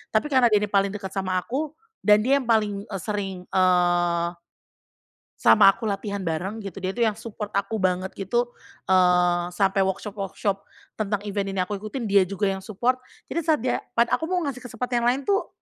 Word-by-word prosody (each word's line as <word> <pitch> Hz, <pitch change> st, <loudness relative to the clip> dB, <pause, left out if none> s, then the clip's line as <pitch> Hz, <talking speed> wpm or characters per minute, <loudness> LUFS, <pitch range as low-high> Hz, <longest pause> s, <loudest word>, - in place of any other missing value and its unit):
tapi 220 Hz, +7 st, +3 dB
karena 255 Hz, -3 st, +5 dB
dia 210 Hz, -, +5 dB
ini 210 Hz, -, -2 dB
paling 200 Hz, -1 st, +2 dB
deket 195 Hz, -2 st, -6 dB
sama 185 Hz, -1 st, 0 dB
aku 300 Hz, +4 st, -3 dB, 0.3 s
dan 210 Hz, 0 st, +6 dB
dia 275 Hz, +3 st, +3 dB
yang 250 Hz, -, -7 dB
paling, 210 Hz, -3 st, +1 dB
eee, 195 Hz, -3 st, -5 dB
sering, 195 Hz, -4 st, -3 dB
eee 175 Hz, -2 st, +3 dB, 1.1 s
sama 195 Hz, -, +7 dB
aku 220 Hz, +2 st, -5 dB
latihan 200 Hz, 0 st, -3 dB
bareng 185 Hz, +5 st, -3 dB
gitu, 195 Hz, -2 st, -8 dB
dia 185 Hz, -, 0 dB
tuh 240 Hz, -, -9 dB
yang 210 Hz, -, -1 dB
support 220 Hz, -1 st, -6 dB
aku 200 Hz, +2 st, -1 dB
banget 185 Hz, 0 st, 0 dB
gitu, 240 Hz, +5 st, -1 dB, 0.4 s
eee, 180 Hz, -1 st, +4 dB
sampai 195 Hz, 0 st, +2 dB
workshop-workshop 195 Hz, 0 st, -3 dB, 0.4 s
tentang 205 Hz, -1 st, -1 dB
event 200 Hz, -1 st, -2 dB
ini -, -, -1 dB
aku 200 Hz, +1 st, -4 dB
ikutin 215 Hz, +5 st, -5 dB
dia 200 Hz, -4 st, +3 dB
juga 200 Hz, 0 st, 0 dB
yang 190 Hz, -, -4 dB
support. 240 Hz, +6 st, -1 dB, 0.3 s
Jadi -, -, 0 dB
saat 310 Hz, -6 st, +1 dB
dia 255 Hz, -, +1 dB, 0.2 s
pat 235 Hz, 0 st, +3 dB
aku 320 Hz, -, +1 dB
mau 360 Hz, -1 st, 0 dB
ngasih 275 Hz, -4 st, -3 dB
kesempatan 250 Hz, 0 st, -3 dB
yang 235 Hz, -, +1 dB
lain 260 Hz, +3 st, +2 dB
tuh, 400 Hz, 0 st, +1 dB
200 Hz, 190 wpm, -24 LUFS, 190-235 Hz, 1.1 s, sama